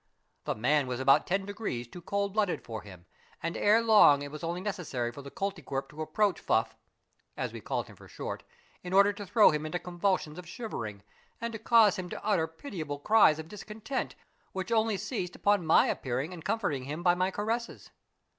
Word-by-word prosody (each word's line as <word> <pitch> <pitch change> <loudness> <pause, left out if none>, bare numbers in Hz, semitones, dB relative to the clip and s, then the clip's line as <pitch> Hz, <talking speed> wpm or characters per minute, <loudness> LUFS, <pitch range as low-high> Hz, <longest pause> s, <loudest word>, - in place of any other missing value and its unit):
The - - -1
man 135 +5 +2
was 125 -1 -3
about 135 +1 +4
ten 195 +2 0
degrees 200 - -4
too 175 +8 -11
cold 200 +2 -2
blooded 205 -4 0
for 110 -2 -6
him, 90 -4 -13 0.4
and 165 - -2
ere 220 +3 +4
long 205 -11 +6
it 145 - -7
was 150 +2 -8
only 170 +2 -2
necessar}^ 155 - -3
for 140 - -9
the 140 - -9
Koltykwerp 165 -8 -4
to 155 +1 -8
approach 185 +6 +1
Fuff, - - +1 0.3
— - - -44
as - - -3
we - - -7
called - - -2
him - - -14
for - - -15
short, - - -6 0.2
— - - -32
in 180 0 -5
order 200 +1 +6
to 205 -1 -8
throw 215 +2 +6
him 150 0 -2
into 155 +3 -2
convulsions 180 -2 -1
of 180 - -10
shivering 115 - -6 0.4
and 235 0 -4
to 225 - -5
cause 220 -2 +5
him 180 -1 -5
to - - -7
utter 190 -7 +2
pitiable 160 - -6
cries 180 0 +5
of 160 0 -7
discontent, 210 +7 -5 0.4
which 190 +3 -4
only 220 -2 +2
ceased 190 -3 -4
upon 200 -5 +2
my 160 - +6
appearing 135 +6 -2
and 165 -3 -9
comforting 180 - -1
him 150 +5 -5
by 175 -1 +5
my 185 +1 +1
caresses. 225 +4 -3
180 Hz, 205 wpm, -30 LUFS, 150-205 Hz, 0.4 s, long